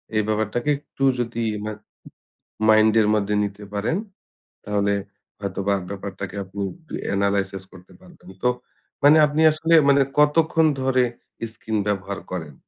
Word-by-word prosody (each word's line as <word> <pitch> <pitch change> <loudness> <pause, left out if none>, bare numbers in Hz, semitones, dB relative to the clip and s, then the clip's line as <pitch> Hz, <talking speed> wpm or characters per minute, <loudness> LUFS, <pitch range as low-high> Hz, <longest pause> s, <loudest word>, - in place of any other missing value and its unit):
এই 110 - +4
ব্যাপারটাকে 110 +5 -1
একটু 140 -2 -7 0.2
যদি 115 -1 -2 0.2
মা 110 - -3 1.0
মাইন্ড 110 0 +6
এর 105 - +3
মধ্যে 105 0 0
নিতে 100 +1 -6
পারেন, 110 - 0 0.7
তাহলে 100 0 +1 0.5
হয়তোবা 100 0 -1
ব্যাপারটাকে 100 -1 -6
আপনি 100 +2 -8 0.5
এনালাইসিস 100 -1 0
করতে 95 -1 -16
পারবেন। 175 - -16
তো 125 - +4 0.5
মানে 145 +2 +7
আপনি 150 +2 -1
আসলে, 165 +2 +2
মানে 140 0 +5 0.2
কতক্ষণ 160 +2 +4 0.2
ধরে 130 -1 +2 0.5
স্কিন 110 0 -4
ব্যবহার 100 -1 -2
করেন? 80 -5 -5
105 Hz, 130 wpm, -23 LUFS, 100-135 Hz, 1.0 s, মানে